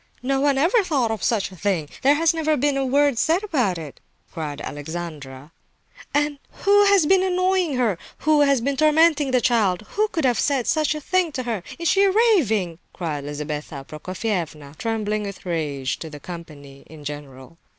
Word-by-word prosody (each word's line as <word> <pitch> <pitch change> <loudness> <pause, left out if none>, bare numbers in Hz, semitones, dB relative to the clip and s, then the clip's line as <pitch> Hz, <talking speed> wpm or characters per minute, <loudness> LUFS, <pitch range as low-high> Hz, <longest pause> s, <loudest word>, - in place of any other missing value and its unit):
"No 270 +1 +1
one 280 -1 +2
ever 360 - +3
thought 275 -10 0
of 220 - -3
such 215 -5 0
a - - -11
thing! 180 -5 -1
There 280 +2 +5
has 330 +2 +3
never 310 -2 +1
been 285 +2 +1
a 275 - 0
word 280 -1 +2
said 335 +5 +2
about 250 - 0
it!" 155 -4 -9 0.3
cried 150 -3 -5
Alexandra. 145 -2 -7 1.1
"Who 410 0 +5
has 400 -5 +5
been 380 +4 +4
annoying 365 -4 +1
her? 225 -8 0 0.2
Who 305 -1 +4
has 280 -4 +3
been 275 +3 -1
tormenting 310 0 +4
the 255 -1 +3
child? 215 -6 +2
Who 430 +1 +1
could 320 -8 -2
have 245 -3 +2
said 275 -5 +1
such 310 -1 +1
a 305 - -5
thing 365 +1 +1
to 255 - -3
her? 230 -5 -3 0.2
Is 335 - -2
she 390 +2 +4
raving?" 280 - +2
cried 150 -5 -4
Lizabetha 145 -1 -5
Prokofievna, 165 -4 -4
trembling 215 -2 -1
with 200 -2 -7
rage, 145 -6 -2
to 160 - -7
the 150 -1 -10
company 145 -5 -10
in 155 -2 -13
general. 145 +1 -9
230 Hz, 180 wpm, -23 LUFS, -, 1.1 s, There